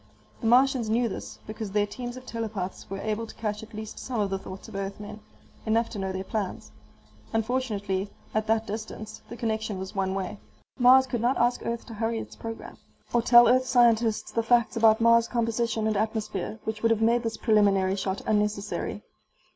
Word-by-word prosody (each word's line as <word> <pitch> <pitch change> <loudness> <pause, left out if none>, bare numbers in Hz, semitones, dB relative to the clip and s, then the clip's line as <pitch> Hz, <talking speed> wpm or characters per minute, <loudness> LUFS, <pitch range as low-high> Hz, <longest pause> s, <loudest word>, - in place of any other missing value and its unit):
The 230 - -2
Martians 250 -1 +4
knew 235 +2 +2
this, 210 - -7
because 215 0 -5
their 205 +1 +2
teams 245 +4 -6
of 255 - -11
telepaths 215 -6 -5
were 195 - -4
able 215 +2 -2
to - - -12
catch 210 -1 -3
at 220 0 -11
least 215 0 -7
some 250 -3 -3
of 200 -2 0
the 195 - -1
thoughts 190 0 -9
of 220 - -12
Earthmen, 200 +2 -5 0.4
enough 225 +1 +1
to 210 - -5
know 190 0 -2
their 190 0 -4
plans. 205 -1 -4 0.6
Unfortunately, 215 -4 -1 0.2
at 215 0 0
that 220 0 +2
distance, 215 0 -6
the 235 - -7
connection 220 -3 -2
was 190 0 -6
one 190 -1 -1
way. 195 +1 -4 0.4
Mars 255 +2 +7
could 245 -3 -3
not 245 +3 +2
ask 240 +1 +1
Earth 235 0 -3
to 230 - -9
hurry 225 +1 -1
its - - -7
program. 225 0 -8 0.4
Or 240 - +4
tell 240 +1 +7
Earth 255 +2 +4
scientists 235 -3 +3
the 230 - +1
facts 235 0 +2
about 225 -1 +5
Mars' 230 0 +5
composition 230 -1 0
and 220 -1 +1
atmosphere 215 -1 -2
which 220 0 -4
would 230 - +3
have 225 -1 +2
made 235 +2 +3
this 225 -1 -3
preliminary 200 -4 +3
shot 190 0 -3
unnecessary. 210 -1 -1
220 Hz, 195 wpm, -27 LUFS, 205-235 Hz, 0.6 s, Mars